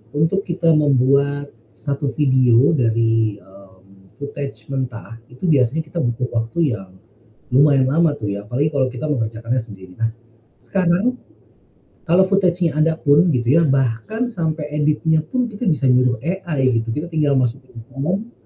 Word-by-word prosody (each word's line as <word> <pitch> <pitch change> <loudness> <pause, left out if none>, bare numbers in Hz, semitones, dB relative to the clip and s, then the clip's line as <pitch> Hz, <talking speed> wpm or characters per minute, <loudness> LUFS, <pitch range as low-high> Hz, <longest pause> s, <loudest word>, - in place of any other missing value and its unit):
untuk 165 +7 0
kita 170 -1 +1
membuat, 140 -1 +2 0.2
1 140 0 -3
video 130 -2 +4
dari, 115 -5 +1
mmm, 95 0 -20
footage 140 -1 -7
mentah 120 -3 -5
itu 125 +6 -17
biasanya 140 +2 +2
kita 160 +3 -6
butuh 125 -2 -1
waktu 120 +6 0
yang, 95 -4 -7 0.6
lumayan 135 0 +4
lama 160 0 +2
tuh 105 -6 -4
ya 100 +1 -6
apalagi 140 +7 0
kalau 135 -3 +1
kita 125 +2 -7
mengerjakannya 115 -1 -2
sendiri. 95 -5 -11
Nah, 115 0 0 0.5
sekarang, 195 +6 0 0.9
kalau 180 +3 +5
footage-nya 180 -4 +1
ada 160 +1 +2
pun 150 +4 +4
gitu 120 - -2
ya, 165 - +5
bahkan 135 - 0
sampai 160 -5 -2
editnya 150 +1 +1
pun 250 +11 -2
kita 225 +1 -6
bisa 155 -3 -1
nyuruh 125 -1 +3
AI 155 -9 0
gitu 115 - -11
kita 150 +7 -3
tinggal 150 -3 +1
masukin 130 0 -3
prompt 180 - -3
140 Hz, 145 wpm, -20 LUFS, 120-160 Hz, 0.9 s, kalau